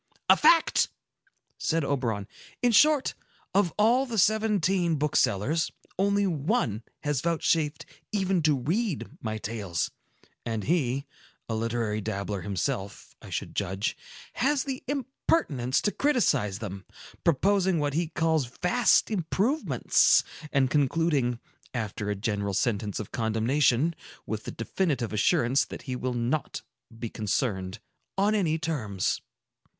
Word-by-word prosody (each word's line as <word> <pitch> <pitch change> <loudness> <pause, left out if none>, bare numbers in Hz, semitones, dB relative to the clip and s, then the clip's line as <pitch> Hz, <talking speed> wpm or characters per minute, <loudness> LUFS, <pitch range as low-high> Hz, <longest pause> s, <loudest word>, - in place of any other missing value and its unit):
"A - - +9
fact!" 330 -1 +4 0.7
said 165 -2 0
Oberon. 115 -8 -1 0.4
"In 245 - +5
short, 295 +4 +5 0.4
of 195 -3 +3
all 240 +6 +4
the 230 -2 -4
seventeen 195 -5 +2
booksellers, 145 0 +1 0.3
only 200 +1 +3
one 150 - 0 0.2
has 145 -3 0
vouchsafed 160 -2 0 0.3
even 190 -4 +1
to 150 -2 +3
read 175 - -1
my 110 -1 -3
tales; 100 -6 -3 0.5
and 110 -3 -3
he—a 140 - -3
literary 110 -1 -1
dabbler 100 0 -3
himself, 95 +1 -3
I - - -11
should - - -4
judge—has 245 - -2
the 265 -2 -5
impertinence 260 - 0
to 205 - +1
criticise 215 - +1
them, 100 -3 -6 0.4
proposing 190 +3 +3
what 145 -2 0
he 165 +2 0
calls 160 -4 +1
vast 230 +5 +3
improvements, 210 - +2 0.3
and 135 -2 +2
concluding, 145 -4 +2 0.4
after 105 -3 -3
a 105 - 0
general 100 -1 -2
sentence 105 -4 0
of 105 - -6
condemnation, 120 +7 +2 0.3
with 110 -1 -4
the - - -4
definitive 125 - -1
assurance 120 +5 +3
that - - -9
he 130 -2 -4
will 125 0 -2
not 120 +6 -2 0.3
be 115 - -4
concerned 100 -3 -1 0.4
on 205 +2 +3
any 170 -7 +1
terms." 125 - -2
145 Hz, 120 wpm, -27 LUFS, -, 0.7 s, A